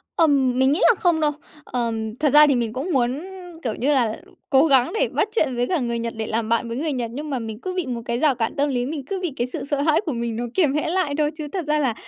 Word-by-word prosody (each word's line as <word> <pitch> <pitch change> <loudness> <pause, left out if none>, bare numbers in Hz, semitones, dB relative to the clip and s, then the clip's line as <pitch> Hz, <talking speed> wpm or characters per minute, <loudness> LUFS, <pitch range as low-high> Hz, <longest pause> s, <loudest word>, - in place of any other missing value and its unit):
Ừm, 275 -6 +3
mình 265 +1 +4
nghĩ 300 - +1
là 475 - +6
không 340 -3 +2
đâu. 300 -1 +3 0.3
Ờm, 225 -4 -3
thật 295 -3 +1
ra 300 0 +8
thì 280 - +3
mình 230 -2 -1
cũng 270 +8 -4
muốn, 255 +2 +1 0.4
kiểu 225 -4 -2
như 280 +5 0
là, 230 -5 0 0.3
cố 270 +2 +5
gắng 265 - +3
để - - +3
bắt - - 0
chuyện 270 - +1
với 245 +1 0
cả 355 -4 0
người 235 -2 -2
Nhật 230 0 -3
để 220 - -3
làm 225 0 -2
bạn 230 +1 +1
với 230 - -4
người 305 +1 -1
Nhật, 235 -3 -3
nhưng 295 +4 -5
mà 265 - -1
mình 220 -2 -6
cứ 370 - -4
bị 365 -4 -2
một 240 -2 -4
cái 235 0 -1
rào 285 -3 +3
cản 225 -1 -2
tâm 285 +1 +1
lý, 245 -2 -1
mình 285 -2 -5
cứ 385 +5 -3
bị 350 -6 -3
cái 240 - 0
sự - - -4
sợ 285 -1 +1
hãi 310 +1 +3
của 310 - -1
mình 235 -1 -3
nó 240 - -3
kiềm 310 -8 +2
hãm 300 +1 -1
lại 350 -4 0
thôi, 300 0 +1
chứ 300 -1 -5
thật 365 -5 -2
ra 300 0 +2
là, 260 -6 +1
265 Hz, 300 wpm, -22 LUFS, 235-300 Hz, 0.4 s, ra